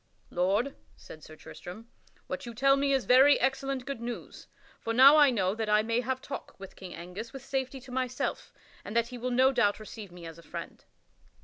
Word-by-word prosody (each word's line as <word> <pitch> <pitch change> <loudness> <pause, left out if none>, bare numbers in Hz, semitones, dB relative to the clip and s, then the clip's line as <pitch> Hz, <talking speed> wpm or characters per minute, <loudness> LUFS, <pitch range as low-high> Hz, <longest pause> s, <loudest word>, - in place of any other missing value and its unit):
"Lord," 195 +10 0 0.2
said 155 - -13
Sir 155 - -12
Tristram, 185 +8 -11 0.4
"what - - -6
you 235 - -8
tell 275 +3 +4
me 275 0 +1
is 270 -2 +1
very 265 +3 +6
excellent 270 0 -1
good 275 -4 -5
news, 240 0 -7 0.3
for 230 - -3
now 270 +5 +8
I 295 -2 +7
know 195 -6 +1
that 220 0 -3
I 210 0 +4
may 230 +2 0
have 260 +1 -3
talk 275 - -8
with 195 -1 -10
King 185 -2 -9
Angus 185 +7 -8
with 270 -1 -9
safety 265 0 -3
to 260 0 -13
myself, 255 -1 -3 0.3
and 205 - -8
that 235 0 +2
he 250 -1 -8
will 250 +2 -2
no 260 +2 +4
doubt 235 -6 +2
receive 215 -2 -9
me 175 -1 -11
as 165 0 -9
a - - -12
friend." - - -8
240 Hz, 210 wpm, -29 LUFS, 205-265 Hz, 0.4 s, now